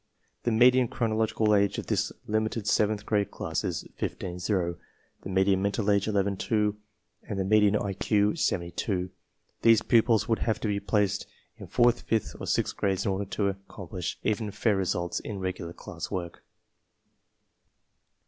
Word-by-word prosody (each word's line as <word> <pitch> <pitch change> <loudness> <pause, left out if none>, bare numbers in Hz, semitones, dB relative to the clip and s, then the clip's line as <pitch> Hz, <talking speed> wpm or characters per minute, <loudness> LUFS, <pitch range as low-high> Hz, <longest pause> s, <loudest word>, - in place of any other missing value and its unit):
The 120 - +2
me 120 +3 +7
dian 125 -1 +2
chronological 110 -2 +1
age 100 -1 +3
of - - -4
this - - 0
limited 110 0 -1
seventh 105 0 +1
grade 105 -2 +1
class - - -3
is - - -3
15 90 -1 -4
0, 90 -3 -1 0.4
the - - -7
median 95 0 +3
mental 100 +1 +1
age 100 0 +2
11 100 -2 +1
2, 105 0 +1 0.5
and 100 - -3
the 95 - 0
median 105 0 +4
IQ 105 +1 +1
72. 90 +1 -1 0.5
These 115 -1 +5
pupils 115 -1 +3
would 115 - +1
have 110 -2 0
to - - -1
be 100 -1 0
placed 100 -1 0 0.3
in - - -9
fourth, 120 0 +3
fifth, 110 -2 -1
and - - -6
sixth - - 0
grades 95 -1 0
in 100 - +1
order 95 +1 -2
to 100 0 -1
accom 95 -2 -12
plish 90 -4 -3
even 110 0 0
fair 105 +1 +1
results 90 -2 -1
in 105 - -6
regular 90 -3 -4
class - - -7
work. 85 -2 -5
100 Hz, 165 wpm, -28 LUFS, 95-110 Hz, 0.5 s, me